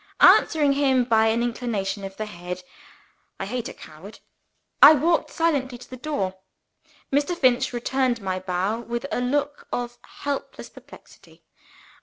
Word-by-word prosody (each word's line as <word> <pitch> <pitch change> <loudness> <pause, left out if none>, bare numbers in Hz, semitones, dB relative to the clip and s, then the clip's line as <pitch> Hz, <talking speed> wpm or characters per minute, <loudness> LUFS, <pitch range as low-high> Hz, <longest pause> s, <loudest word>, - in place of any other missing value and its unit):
Answering 295 -3 +5
him 270 -3 +2
by 225 -2 +3
an 230 +2 +1
inclination 220 -5 -3
of 195 0 -8
the 215 - -3
head 180 -2 -7 0.8
(I - - -3
hate 240 +3 -4
a - - -9
coward!) 165 +8 -13 0.6
I 300 +2 +10
walked 325 +4 +1
silently 280 -6 0
to 240 - -14
the 255 - -9
door. 200 -9 -3 0.7
Mr. 290 +5 +1
Finch 255 -4 +2
returned 245 0 0
my 190 -2 -3
bow 185 +4 -2
with 235 +2 -5
a - - -1
look 285 +3 -2
of 240 0 -4
helpless 285 -1 -6
perplexity. - - -17
240 Hz, 145 wpm, -24 LUFS, 200-275 Hz, 0.8 s, I